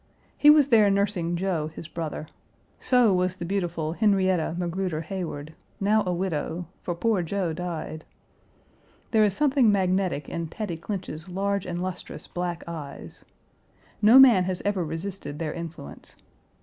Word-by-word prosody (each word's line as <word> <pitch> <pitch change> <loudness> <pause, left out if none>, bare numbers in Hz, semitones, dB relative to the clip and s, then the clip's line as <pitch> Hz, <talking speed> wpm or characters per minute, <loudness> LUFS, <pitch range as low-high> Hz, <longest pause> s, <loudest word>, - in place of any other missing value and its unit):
He 295 - +6
was 300 -2 +6
there 215 -4 +6
nursing 195 -4 0
Joe, 170 -4 -1
his 160 +1 -9
brother. 160 -2 -5 0.5
So 245 -5 +4
was 180 0 +1
the 175 - -6
beautiful 170 -4 -2
Henrietta 190 -5 +2
Magruder 175 -2 -2
Heyward, 160 -3 -5 0.3
now 210 +2 +3
a - - +1
widow, 175 -1 -2 0.2
for 175 - -3
poor 215 +1 +1
Joe 175 0 -2
died. 165 -2 -5 1.1
There 220 -2 +5
is 200 -2 +2
something 270 -6 +4
magnetic 185 -6 0
in 170 -1 -4
Tatty 175 0 -5
Clinch's 175 -2 -6
large 200 +1 -1
and 175 0 -3
lustrous 185 -1 -6
black 175 -1 -4
eyes. 155 -4 -8 0.8
No 220 +4 +8
man 240 -9 +8
has 185 -1 -2
ever 200 -3 +1
resisted 165 -1 -5
their 155 -1 -3
influence. 165 -3 -8
180 Hz, 145 wpm, -26 LUFS, 165-200 Hz, 1.1 s, No